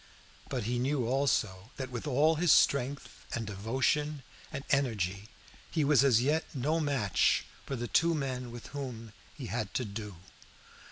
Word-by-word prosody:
But 130 Hz, -4 st, -2 dB
he 120 Hz, +3 st, -1 dB
knew 130 Hz, 0 st, 0 dB
also 115 Hz, -6 st, 0 dB
that, 130 Hz, -1 st, -5 dB
with 125 Hz, +4 st, -5 dB
all 145 Hz, +4 st, +4 dB
his 165 Hz, +1 st, +3 dB
strength 140 Hz, +1 st, +3 dB, 0.3 s
and 115 Hz, -, -3 dB
devotion 130 Hz, +8 st, 0 dB, 0.3 s
and 140 Hz, -2 st, -5 dB
energy, 105 Hz, -7 st, 0 dB, 0.4 s
he 160 Hz, -, +1 dB
was 140 Hz, -2 st, +5 dB
as 125 Hz, -4 st, +4 dB
yet 155 Hz, +4 st, +2 dB
no 150 Hz, +5 st, +1 dB
match 135 Hz, -, +2 dB, 0.2 s
for 135 Hz, -, -2 dB
the 120 Hz, -1 st, -3 dB
two 165 Hz, +7 st, +3 dB
men 130 Hz, -4 st, -3 dB
with 120 Hz, 0 st, -9 dB
whom 125 Hz, -6 st, -6 dB, 0.2 s
he 135 Hz, -, -7 dB
had 110 Hz, -3 st, -3 dB
to 125 Hz, -, 0 dB
do. 105 Hz, -1 st, -6 dB
130 Hz, 160 wpm, -31 LUFS, 115-145 Hz, 0.4 s, was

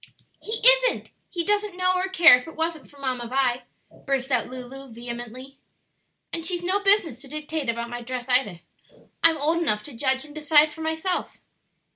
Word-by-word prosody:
"He 445 Hz, +2 st, +2 dB
isn't! -, -, +5 dB, 0.2 s
he 345 Hz, -2 st, -2 dB
doesn't 415 Hz, -1 st, 0 dB
know 365 Hz, 0 st, +2 dB
or 370 Hz, +1 st, -1 dB
care 345 Hz, -8 st, +8 dB
if 250 Hz, +3 st, -6 dB
it 325 Hz, -, -11 dB
wasn't 320 Hz, -1 st, -3 dB
for 285 Hz, -, -19 dB
Mamma 255 Hz, -3 st, -3 dB
Vi," 255 Hz, -1 st, 0 dB, 0.4 s
burst 270 Hz, -1 st, -2 dB
out 250 Hz, -2 st, +1 dB
Lulu 255 Hz, +1 st, -9 dB
vehemently. 240 Hz, +3 st, -8 dB, 0.7 s
"And 330 Hz, -, -3 dB
she's 350 Hz, +1 st, -1 dB
no 375 Hz, +3 st, +1 dB
business 395 Hz, -, +2 dB
to 275 Hz, -, -11 dB
dictate 305 Hz, -1 st, -4 dB
about 235 Hz, 0 st, -3 dB
my 240 Hz, 0 st, -5 dB
dress 245 Hz, +1 st, -6 dB
either. 250 Hz, -9 st, +1 dB, 0.6 s
I'm 330 Hz, -1 st, +5 dB
old 320 Hz, +4 st, 0 dB
enough 210 Hz, -10 st, 0 dB
to 290 Hz, -, -10 dB
judge 265 Hz, +3 st, -1 dB
and 295 Hz, -, -13 dB
decide 300 Hz, 0 st, +3 dB
for 320 Hz, -, -10 dB
myself." 320 Hz, +3 st, -3 dB
290 Hz, 180 wpm, -24 LUFS, 250-340 Hz, 0.7 s, care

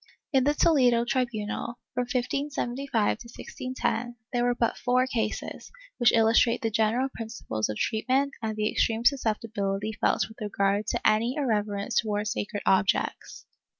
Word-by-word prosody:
In 265 Hz, -1 st, +4 dB
the 290 Hz, +1 st, +2 dB
Toledo 245 Hz, -8 st, +4 dB
tri 255 Hz, +1 st, +1 dB
bunal, 230 Hz, 0 st, -4 dB, 0.2 s
from 250 Hz, 0 st, -1 dB
1575 260 Hz, -2 st, -1 dB
to 235 Hz, -, -11 dB
1610, 245 Hz, -1 st, -3 dB, 0.2 s
there 240 Hz, 0 st, +1 dB
were 245 Hz, 0 st, +2 dB
but 235 Hz, -1 st, 0 dB
four 250 Hz, +1 st, +2 dB
cases, 225 Hz, -4 st, -3 dB, 0.3 s
which 240 Hz, -1 st, +6 dB
illus 225 Hz, 0 st, +5 dB
trate 235 Hz, 0 st, +1 dB
the 225 Hz, -, 0 dB
general 225 Hz, +5 st, +2 dB
principles 220 Hz, -, -4 dB
of 105 Hz, -, -3 dB
treatment 260 Hz, +5 st, 0 dB
and 220 Hz, -1 st, -2 dB
the 215 Hz, 0 st, +1 dB
extreme 225 Hz, 0 st, +1 dB
suscepti 230 Hz, -4 st, +1 dB
bility 200 Hz, +2 st, -1 dB
felt -, -, +2 dB
with 220 Hz, +1 st, -15 dB
regard 200 Hz, 0 st, 0 dB
to -, -, 0 dB
any 225 Hz, +4 st, +2 dB
irreverence 210 Hz, -7 st, -1 dB
towards 210 Hz, -1 st, -1 dB
sacred 205 Hz, -2 st, -4 dB
objects. 190 Hz, 0 st, +1 dB
230 Hz, 155 wpm, -27 LUFS, 215-250 Hz, 0.3 s, which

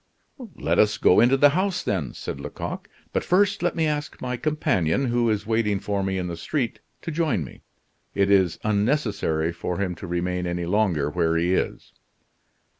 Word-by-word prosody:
"Let -, -, 0 dB
us 105 Hz, 0 st, +4 dB
go 90 Hz, -, +5 dB
into 125 Hz, +4 st, +5 dB
the 145 Hz, +2 st, +6 dB
house, 185 Hz, +5 st, 0 dB
then," 90 Hz, -9 st, -2 dB
said -, -, -6 dB
Lecoq. -, -, -6 dB, 0.2 s
"But -, -, 0 dB
first 200 Hz, +2 st, +2 dB
let 175 Hz, 0 st, 0 dB
me 165 Hz, -2 st, +1 dB
ask 150 Hz, -1 st, -3 dB
my 125 Hz, 0 st, -3 dB
companion, 125 Hz, -, 0 dB
who 120 Hz, -1 st, +1 dB
is 105 Hz, -1 st, -1 dB
waiting 110 Hz, -2 st, +1 dB
for 100 Hz, 0 st, -2 dB
me 95 Hz, 0 st, -1 dB
in 90 Hz, -, -2 dB
the 85 Hz, -1 st, -4 dB
street, 120 Hz, -, -2 dB, 0.2 s
to 165 Hz, -, -4 dB
join 155 Hz, -, 0 dB
me. 65 Hz, -, -12 dB, 0.5 s
It 100 Hz, 0 st, +2 dB
is 95 Hz, -4 st, +3 dB
unnecessary 105 Hz, -, 0 dB
for 85 Hz, +1 st, -4 dB
him 95 Hz, -3 st, -1 dB
to 95 Hz, -, -8 dB
remain 90 Hz, +1 st, -2 dB
any 85 Hz, 0 st, -2 dB
longer 85 Hz, -7 st, +1 dB
where 85 Hz, 0 st, +1 dB
he 85 Hz, +2 st, +1 dB
is." -, -, -2 dB
100 Hz, 185 wpm, -24 LUFS, 90-135 Hz, 0.5 s, the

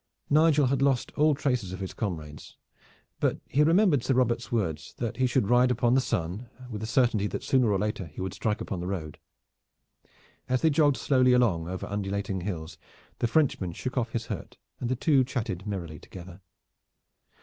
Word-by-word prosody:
Nigel 150 Hz, -1 st, +5 dB
had 135 Hz, +1 st, +1 dB
lost 135 Hz, -3 st, +1 dB
all 150 Hz, 0 st, +4 dB
traces 125 Hz, -10 st, -1 dB
of 95 Hz, -, -6 dB
his 95 Hz, -1 st, -5 dB
comrades; 80 Hz, -8 st, -6 dB, 0.6 s
but -, -, +1 dB
he 140 Hz, -, +2 dB
remembered 165 Hz, -, +4 dB
Sir 135 Hz, -, +1 dB
Robert's 120 Hz, 0 st, +1 dB
words 80 Hz, -10 st, -2 dB
that 115 Hz, -3 st, -3 dB
he 130 Hz, 0 st, +2 dB
should 125 Hz, -4 st, +1 dB
ride 125 Hz, +2 st, +4 dB
upon 120 Hz, 0 st, +2 dB
the 135 Hz, -, +4 dB
sun 95 Hz, +3 st, -3 dB, 0.2 s
with 105 Hz, -1 st, -5 dB
the 110 Hz, -, -3 dB
certainty 120 Hz, -4 st, +2 dB
that -, -, -5 dB
sooner 125 Hz, -5 st, +3 dB
or 100 Hz, -, +2 dB
later 105 Hz, -2 st, -2 dB
he 75 Hz, -, -12 dB
would 95 Hz, 0 st, -3 dB
strike 105 Hz, +3 st, -2 dB
upon 95 Hz, -, -4 dB
the 90 Hz, -, -4 dB
road. 80 Hz, -6 st, -5 dB, 1.3 s
As 130 Hz, 0 st, +1 dB
they 160 Hz, -, +5 dB
jogged 145 Hz, -2 st, +3 dB
slowly 130 Hz, -2 st, +3 dB
along 100 Hz, -10 st, +2 dB
over 95 Hz, +1 st, -4 dB
undulating 100 Hz, -1 st, -3 dB
hills, 85 Hz, -4 st, -5 dB, 0.4 s
the 120 Hz, -, +1 dB
Frenchman 115 Hz, -, +1 dB
shook 130 Hz, +8 st, -5 dB
off 115 Hz, -3 st, -1 dB
his 115 Hz, -1 st, -2 dB
hurt -, -, -7 dB, 0.2 s
and 120 Hz, -, -3 dB
the 130 Hz, -, +1 dB
two 135 Hz, +1 st, +3 dB
chatted 110 Hz, -7 st, -4 dB
merrily 85 Hz, -6 st, -5 dB
together. 90 Hz, 0 st, -11 dB
115 Hz, 185 wpm, -27 LUFS, 95-130 Hz, 1.3 s, Nigel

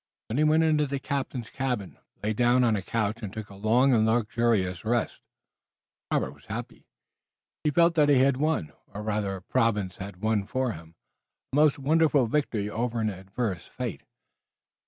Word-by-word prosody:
Then 115 Hz, +6 st, -1 dB
he -, -, +4 dB
went 155 Hz, +1 st, +4 dB
into 155 Hz, -2 st, +2 dB
the 140 Hz, +1 st, -2 dB
captain's 135 Hz, -4 st, -4 dB
cabin, 125 Hz, -8 st, -3 dB, 0.2 s
lay 110 Hz, +1 st, 0 dB
down 120 Hz, +3 st, +3 dB
on 115 Hz, -3 st, +3 dB
a 100 Hz, -, -2 dB
couch, 110 Hz, +2 st, -2 dB
and 105 Hz, -4 st, -5 dB
took 110 Hz, -1 st, -7 dB
a -, -, -11 dB
long 120 Hz, +7 st, +3 dB
and 110 Hz, -2 st, +4 dB
luxurious 110 Hz, -5 st, +1 dB
rest. 115 Hz, +1 st, -1 dB, 0.9 s
Robert -, -, 0 dB
was -, -, -19 dB
happy. -, -, -7 dB, 0.8 s
He 150 Hz, -, +2 dB
felt 170 Hz, +3 st, +4 dB
that 150 Hz, -3 st, +3 dB
he 140 Hz, -, +6 dB
had 130 Hz, 0 st, +4 dB
won, 150 Hz, -, 0 dB, 0.2 s
or 105 Hz, -, -5 dB
rather 105 Hz, -2 st, -1 dB
that 95 Hz, 0 st, -12 dB
Providence 105 Hz, -5 st, +1 dB
had 95 Hz, 0 st, -9 dB
won 110 Hz, -2 st, +1 dB
for 130 Hz, -1 st, -1 dB
him, 80 Hz, -3 st, -11 dB, 0.6 s
a -, -, 0 dB
most 150 Hz, -1 st, +4 dB
wonderful 150 Hz, -1 st, +3 dB
victory 115 Hz, -5 st, -1 dB
over 115 Hz, +2 st, -2 dB
adverse 95 Hz, -1 st, -3 dB
fate. -, -, -5 dB
115 Hz, 175 wpm, -27 LUFS, 105-135 Hz, 0.9 s, he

